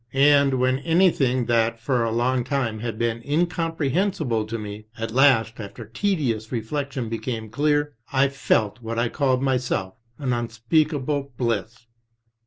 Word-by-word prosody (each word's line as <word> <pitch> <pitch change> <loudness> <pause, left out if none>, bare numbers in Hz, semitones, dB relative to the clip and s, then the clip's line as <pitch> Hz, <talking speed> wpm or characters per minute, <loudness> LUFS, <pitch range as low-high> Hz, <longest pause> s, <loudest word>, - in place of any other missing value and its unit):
And 140 0 +5
when 130 +1 +2
anything 140 -6 +2
that 115 -1 +1
for 120 +1 0
a 115 - 0
long 120 +2 +1
time 125 -5 -1
had 115 -1 -4
been 115 0 -1
incomprehensible 160 - 0
to 115 +1 -3
me, 105 0 -7
at 115 0 -4
last 120 -3 +4
after 105 +2 -8
tenacious 120 - -1
re 120 - 0
flection 140 0 -3
became 115 -1 -4
clear, 145 +3 +1 0.2
I 135 0 +3
felt 120 -5 0
what 115 0 -4
I 115 0 +1 0.3
myself 125 -8 -1
called - - -39
'* 115 - -41
an 125 - +2
un 120 -1 -2
speakable 140 +3 0
bliss." 115 -1 -2
125 Hz, 155 wpm, -24 LUFS, 115-140 Hz, 0.3 s, And